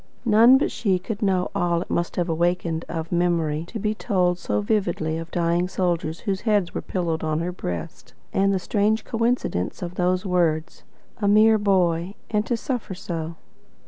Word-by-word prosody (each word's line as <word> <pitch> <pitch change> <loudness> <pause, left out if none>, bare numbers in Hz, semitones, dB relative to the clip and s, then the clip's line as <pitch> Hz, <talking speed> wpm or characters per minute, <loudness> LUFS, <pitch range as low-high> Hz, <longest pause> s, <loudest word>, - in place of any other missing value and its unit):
None 230 +4 +7
but 275 - 0
she 195 -5 +1
could 200 +3 -6
know 190 -3 +1
all 170 -1 +1
it - - -23
must 170 0 -1
have 175 -1 0
awakened 170 0 0
of 165 -1 -4
memory 170 -3 +1
to 230 - -6
be 210 0 -1
told 180 -4 0
so 105 -9 -1
vividly 160 - 0
of 165 - -6
the - - -31
dying 170 +1 +1
soldiers 175 -3 -1
whose 195 -3 -2
heads 205 -6 +1
were - - -3
pillowed 170 -4 -2
on 155 -1 0
her 170 +2 -2
breast, 90 - -6 0.2
and 195 0 +3
the 195 - +2
strange 210 +4 0
coincidence 230 - -1
of 175 0 -5
those 180 +1 0
words, 165 -3 0 0.4
"A 205 - +2
mere 215 +1 +5
boy 185 -2 +1 0.2
and 210 -1 +2
to 240 - 0
suffer 235 -6 -4
so!" 165 -2 -5
180 Hz, 180 wpm, -24 LUFS, 165-205 Hz, 0.4 s, None